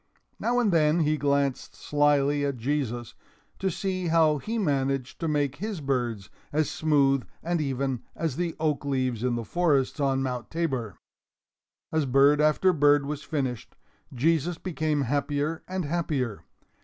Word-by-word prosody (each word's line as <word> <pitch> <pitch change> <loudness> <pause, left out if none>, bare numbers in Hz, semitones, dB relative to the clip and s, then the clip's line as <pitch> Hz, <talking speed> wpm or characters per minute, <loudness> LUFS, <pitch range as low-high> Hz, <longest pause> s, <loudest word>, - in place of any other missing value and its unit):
Now 245 +1 0
and 225 -5 +2
then 155 +1 +3
he 155 0 +2
glanced 140 -2 0
slyly 145 -1 +2
at 140 -2 -1
Jesus, 120 -2 -2 0.5
to 190 - 0
see 185 0 -2
how 160 -2 +3
he 225 - -3
managed 135 - -1
to 165 - -2
make 145 -3 0
his 210 -1 -4
birds 120 -8 -2 0.2
as 155 +1 0
smooth 140 -3 +2 0.2
and 170 -1 0
even 135 -3 -1
as 160 -6 -2
the 170 0 -2
oak 155 -2 0
leaves 130 -4 -1
in 125 -1 +1
the 115 -1 -4
forests 150 -3 +1
on 135 -1 +1
Mount 125 -3 -4
Tabor. 130 - -2 0.9
As 160 -3 +1
bird 140 +3 +5
after 155 +5 +3
bird 145 -2 +4
was 145 0 -4
finished, 135 -7 -3 0.4
Jesus 160 +5 +1
became 155 -5 -1
happier 145 +4 -1
and 185 -2 -3
happier. 145 -8 -2
145 Hz, 150 wpm, -27 LUFS, 135-160 Hz, 0.9 s, bird